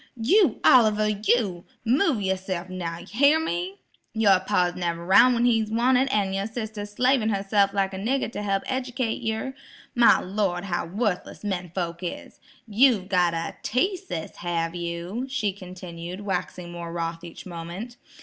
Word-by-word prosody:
"You, 365 - +3
Oliver, 215 -4 +5
you; 210 -3 0 0.2
move 260 - +2
yourse'f 185 -1 -2
now, 170 -2 -4
hyar 280 +9 +4
me? 185 - -3 0.3
Your 200 -4 +5
pa's 180 -1 +1
never 170 -1 -3
'roun' 245 +7 +6
when 235 +1 +2
he's 225 -3 +2
wanted, 250 +4 +3
an' 200 -6 +1
your 195 +1 -1
sister's 220 -2 -6
slavin' 250 -1 +2
herse'f 200 0 +2
like 195 -1 0
a 190 - -5
nigger 245 +4 -1
to 210 - -5
help 195 -1 -1
ejekate 255 -3 -2
yer. 225 +4 -2 0.4
My 240 -1 +6
Lord, 190 -2 -1
how 175 -3 -2
worthless 200 +1 -2
men 180 -4 -3
folks 170 -2 -3
is! 175 - -6 0.3
You've 220 -3 +3
got 175 -3 +2
a 165 0 -4
teaseus, 345 - -2
have 170 -1 -2
you?" 175 +8 -4
she 225 -7 -1
continued, 180 -1 -8
waxing 180 -3 -4
more 170 -1 -6
wroth 165 0 -4
each 170 -1 -10
moment. 180 +7 -7
200 Hz, 155 wpm, -25 LUFS, 175-235 Hz, 0.4 s, roun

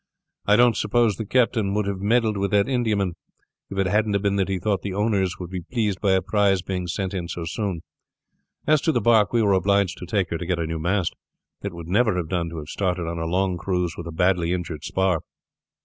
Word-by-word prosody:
I 105 - +6
don't 120 0 +5
suppose 110 0 +2
the 110 - -5
captain 110 -4 +2
would 105 -1 +1
have 100 -1 -3
meddled 110 +1 +2
with 100 0 0
that 100 +2 +3
Indiaman 110 -8 0 0.6
if 100 - -7
it 95 - +2
hadn't 105 +1 +1
been 100 -1 +1
that 95 -1 0
he 95 - 0
thought 100 +1 -1
the 100 -2 -4
owners 100 -3 +1
would 90 -1 -7
be 90 -1 -4
pleased 105 0 -2
by 100 -2 +3
a 95 0 +2
prize 95 -1 +2
being 90 -2 -3
sent 95 +2 -3
in 90 -3 -3
so 85 -1 -5
soon. 95 -1 -3 0.8
As 155 -1 +4
to 160 - +2
the 125 - +1
bark, 110 -2 +4
we 115 -2 +2
were 100 -2 +3
obliged 100 0 +2
to 90 - -7
take 95 -2 0
her 85 - -2
to 85 - -4
get 90 -1 0
a 85 - -1
new 80 0 -3
mast. 90 +1 0 0.5
It 100 - -4
would 85 -1 -8
never 105 +1 +2
have 85 -3 -3
done 85 -2 -1
to 85 - -7
have 75 -1 -7
started 90 -2 -1
on 85 0 -4
a 80 - -2
long 90 +1 0
cruise 90 -3 -1
with 85 - -7
a - - -5
badly 90 0 +1
injured 85 -4 -4
spar." 95 -4 0
95 Hz, 240 wpm, -24 LUFS, 90-105 Hz, 0.8 s, I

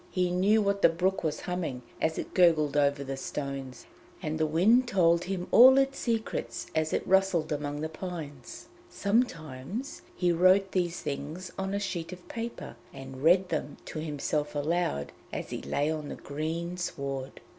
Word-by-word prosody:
He 180 -1 0
knew 200 +4 +3
what 200 0 0
the - - +7
brook 180 +4 0
was 155 -2 -1
humming 165 -9 -3 0.2
as 160 0 +1
it - - -5
gurgled 160 -5 +4
over 140 -1 +2
the 135 0 -4
stones, 135 -2 -5 0.3
and 155 +1 -3
the 155 - +2
wind 215 +11 +4
told 170 -5 +3
him 185 -1 -3
all 260 +3 +9
its 275 0 +2
secrets 230 -2 -2
as 155 0 0
it - - -1
rustled 190 -5 +2
among 145 0 -2
the 155 - -1
pines. 160 -6 -8 0.2
Sometimes 200 - -2
he 180 -1 +2
wrote 185 +3 +4
these 175 -2 0
things 155 +6 -5
on 195 +1 -2
a - - 0
sheet 180 -4 -4
of 180 -1 -11
paper 230 - -6
and 135 -1 -9
read 180 +4 +4
them 150 -3 -3
to 155 - -6
himself 150 -1 -2
aloud 145 - -1 0.2
as - - -5
he - - -4
lay 145 +2 0
on 155 -2 -4
the - - -5
green 165 +4 -4
sward. 140 -6 -4
165 Hz, 170 wpm, -29 LUFS, 145-190 Hz, 0.3 s, all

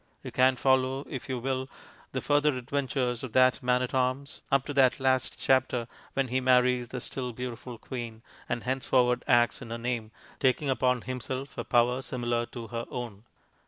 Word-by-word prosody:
You - - -6
can 130 0 +4
follow, 130 +1 +2
if 130 -3 -6
you 130 - -1
will, 130 +1 -2 0.4
the - - -2
further 145 -1 +2
adventures 125 -1 -1
of 130 -4 -7
that 130 -1 +4
man 125 0 +2
at 125 - -4
arms, 130 +2 -1
up 135 -1 +3
to 145 - -4
that 130 -2 +4
last 130 -1 +1
chapter 130 -3 +2 0.3
when 135 -2 0
he 130 +2 +1
marries 125 -1 +3
the 125 - -5
still 125 0 -4
beautiful 125 0 -6
queen, 115 -1 -7 0.3
and 120 -1 -2
henceforward 125 -1 +2
acts 120 0 +3
in 120 - -8
her 115 - -3
name, 115 -2 -2 0.3
taking 135 +1 +2
upon 125 -1 +2
himself 130 +2 -5
a - - -3
power 125 +1 +2
similar 120 -2 -2
to 115 -2 -8
her 115 0 -4
own. 115 -4 -6
125 Hz, 180 wpm, -28 LUFS, 120-130 Hz, 0.4 s, can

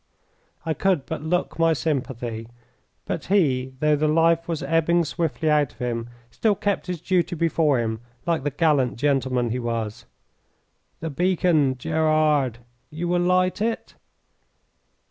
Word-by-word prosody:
I 160 - 0
could 180 -5 +1
but - - -5
look 170 +2 -1
my 165 0 +4
sympathy, 125 -7 -3 0.6
but - - -4
he, 135 -9 +1
though 150 0 +4
the 155 +1 +1
life 165 +2 +3
was 165 -2 -3
ebbing 165 +1 +2
swiftly 160 0 -2
out 150 -3 +2
of - - -26
him, 120 -2 -3 0.2
still 215 -2 +1
kept 200 0 -1
his 180 -2 -3
duty 175 0 0
before 160 -3 +2
him, 110 -1 -2 0.3
like 170 -2 +1
the 145 - 0
gallant 145 -3 +2
gentleman 130 -3 0
he 125 - -1
was. 115 -3 -3 1.0
"The 165 -1 -3
beacon, 160 -4 +2
Gerard! 155 -3 +1 0.3
You 165 +3 -4
will 175 0 +2
light 185 +2 +2
it?" 225 +1 -2
155 Hz, 145 wpm, -24 LUFS, 130-170 Hz, 1.0 s, my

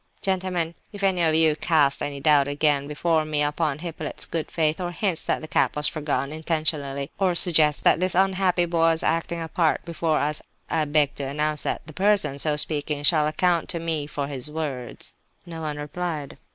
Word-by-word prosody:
"Gentlemen, 185 -3 -1 0.2
if 205 -2 -8
any 190 -2 +2
one 165 - +4
of 155 - +1
you 160 -1 +4
casts 150 -3 +2
any 145 -1 -4
doubt 140 -1 +4
again, 145 -1 +1
before 155 +2 0
me, 150 -1 0
upon 150 0 -1
Hippolyte's 160 -2 -5
good 165 -2 -4
faith, 160 +1 0
or 175 - -2
hints 175 -1 -1
that - - 0
the 155 - -7
cap - - +1
was 150 0 0
forgotten 145 -3 -1
intentionally, 155 -3 -2
or 185 -3 +2
suggests 155 -4 +4
that - - +4
this 185 0 +4
unhappy 185 -1 +2
boy 170 -1 -2
was 165 0 0
acting 165 +1 -1
a 165 - -4
part 160 0 0
before 165 -2 -1
us, 150 +1 0 0.3
I 160 -2 +1
beg 145 -1 +2
to 140 - -3
announce 150 +2 -1
that - - -3
the 155 - -11
person 195 -6 +1
so 150 +1 +1
speaking 150 -1 0
shall 150 0 +4
account 170 +2 +1
to 170 - 0
me 160 -3 -2
for 145 -1 -3
his 140 0 -5
words." 145 -6 -5 0.3
No 165 -2 -8
one 150 -2 -3
replied. 150 -1 -5
155 Hz, 200 wpm, -24 LUFS, 145-170 Hz, 0.3 s, one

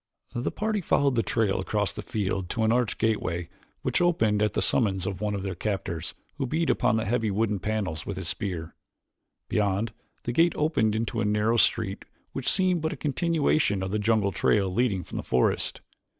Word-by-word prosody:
The 120 - -1
party 215 -1 -1
followed 140 -5 +2
the 115 - +2
trail 110 -1 +1
across 105 +1 0
the - - -6
field 95 -3 -2
to 115 - -1
an 110 - +3
arched 120 -2 +1
gateway 90 -6 -1 0.3
which - - +1
opened 110 -13 +2
at 105 - +2
the - - 0
summons 95 -7 +2
of 95 -1 -4
one 105 -1 0
of 100 - -4
their 95 -1 -2
captors, 95 -4 -3 0.2
who 135 -3 -1
beat 160 +5 +1
upon 110 - +2
the 110 - -1
heavy 115 -1 +1
wooden 105 0 0
panels 95 -6 -2
with 100 - -5
his 95 -3 -4
spear. 85 -4 -3 0.7
Beyond, 105 +1 0 0.3
the 120 - -2
gate 165 +7 +4
opened 115 -9 +1
into 115 +1 -1
a - - +1
narrow 105 +2 +2
street 110 -3 +1 0.3
which 135 - -1
seemed 185 -3 +2
but 160 +1 -1
a - - -8
continuation 150 - +1
of 95 - -3
the 105 - 0
jungle 105 -2 +2
trail 95 -1 +2
leading 100 -5 +1
from - - -7
the - - -3
forest. 65 - +1
110 Hz, 195 wpm, -27 LUFS, 95-120 Hz, 0.7 s, gate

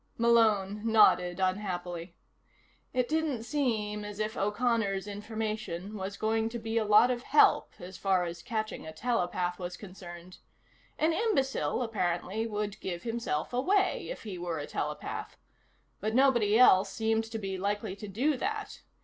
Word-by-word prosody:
Malone 215 -4 +3
nodded 205 -5 +4
unhappily. 180 -3 -2 0.8
It 250 -2 +1
didn't 305 -6 -1
seem 225 -6 -1
as 205 -1 -7
if 215 +1 -2
O'Connor's 210 -2 0
information 215 -2 -4
was 200 0 -5
going 220 +1 0
to 235 - -5
be 225 0 -1
a - - +1
lot 215 +4 +6
of 240 -1 -2
help 295 +3 +4
as 180 +1 -10
far 190 -2 +2
as 170 -1 -5
catching 215 +2 -3
a 160 - -7
telepath 180 -3 -1
was 180 0 -5
concerned. 180 -2 -11 0.6
An 315 +2 +2
imbecile, 300 - 0
apparently, 205 0 -1
would 210 -2 -3
give 175 -2 -4
himself 230 -7 -2
away 375 +10 +1
if - - -6
he 195 -5 -6
were 175 -2 -3
a 145 - -4
telepath. - - -4 0.6
But 215 +3 -2
nobody 240 -6 +4
else 195 -5 +6
seemed 225 +1 0
to 225 0 -5
be 195 -3 -4
likely 205 0 -2
to 210 - -7
do 260 +9 0
that. 425 - -4
210 Hz, 150 wpm, -30 LUFS, 190-235 Hz, 0.8 s, lot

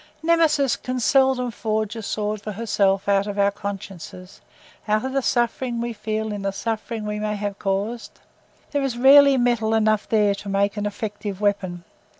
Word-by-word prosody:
Nemesis 320 -5 +3
can 255 0 -4
seldom 260 -1 +2
forge 215 0 -2
a 225 - -5
sword 210 0 -3
for 210 0 -6
herself 200 -3 0
out 200 0 +2
of 205 0 -5
our 200 0 +3
consciences—out 195 +2 -6
of 265 - -3
the 275 - +1
suffering 240 0 0
we 235 0 -3
feel 215 0 -3
in 205 - -5
the 195 - -1
suffering 220 +2 -4
we 210 0 -3
may 210 0 -2
have 205 -1 -4
caused: 205 +4 -3 0.5
there 285 - 0
is 265 -3 -2
rarely 275 +2 +7
metal 240 -3 +1
enough 215 -1 +1
there 210 -2 +3
to 200 0 -8
make 200 +1 +1
an 205 0 -2
effective 205 -2 -5
weapon. 195 -4 -1
215 Hz, 170 wpm, -23 LUFS, 200-240 Hz, 0.5 s, rarely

